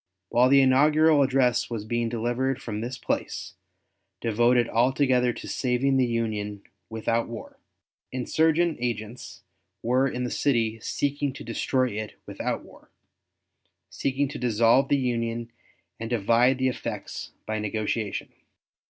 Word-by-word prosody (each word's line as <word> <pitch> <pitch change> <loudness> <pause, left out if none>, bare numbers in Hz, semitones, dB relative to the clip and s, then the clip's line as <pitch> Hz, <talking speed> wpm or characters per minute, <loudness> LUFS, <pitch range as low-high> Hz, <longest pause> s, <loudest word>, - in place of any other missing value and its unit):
While 125 +2 +4
the 140 0 +6
inaugural 150 +3 +5
address 130 -3 +2
was 115 -3 -4
being 120 +1 -1
delivered 120 +3 -1
from 105 -2 -5
this 125 +2 -4
place, 95 -4 -3 0.7
devoted 120 +1 +3
altogether 125 +1 +2
to - - -9
saving 135 +1 +1
the 130 -1 +3
Union 105 -3 -2 0.3
without 115 +1 -1
war, 115 -2 -9 0.5
insurgent 160 +6 +1
agents 115 -1 -5 0.4
were 130 +3 +2
in 125 -1 -3
the 125 - -3
city 115 -5 +1
seeking 145 +3 -1
to - - -9
destroy 130 +3 0
it 105 +1 -6
without - - -3
war - - -18 1.0
seeking 140 +1 -1
to - - -6
dissolve 120 +2 +3
the 145 - +4
Union 115 -2 -2 0.5
and 115 0 -5
divide 120 +3 +3
the 130 0 +1
effects 125 - -5
by 110 0 -2
negotiation. 105 0 -3
120 Hz, 130 wpm, -26 LUFS, 115-130 Hz, 1.0 s, the